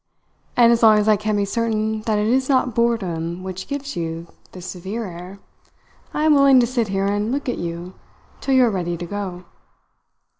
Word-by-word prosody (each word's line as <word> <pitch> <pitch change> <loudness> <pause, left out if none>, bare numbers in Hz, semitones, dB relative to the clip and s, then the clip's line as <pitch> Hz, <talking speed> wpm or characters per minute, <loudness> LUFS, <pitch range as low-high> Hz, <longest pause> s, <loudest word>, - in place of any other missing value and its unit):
"And 235 -1 +6
as 235 - +2
long 220 -2 +7
as 210 0 +1
I 215 - +6
can 210 +1 -2
be 200 - +1
certain 220 0 -1
that 215 -1 +2
it 210 - +1
is 260 +4 +1
not 255 -3 +2
boredom 185 -7 -1
which 185 0 -6
gives 280 0 -5
you 165 0 -4 0.3
this 180 -1 -10
severe 195 +5 -5
air, 180 +2 -9 0.7
I 300 - -2
am 310 -1 +5
willing 275 -2 +6
to 240 - +4
sit 235 -2 -1
here 195 0 -1
and 205 +3 -1
look 280 +1 -3
at 245 - -2
you 170 +2 -5 0.5
till 270 - 0
you 255 -1 +6
are 230 - +1
ready 175 -3 -2
to 175 - -6
go." 185 -2 -6
210 Hz, 200 wpm, -21 LUFS, 185-235 Hz, 0.7 s, long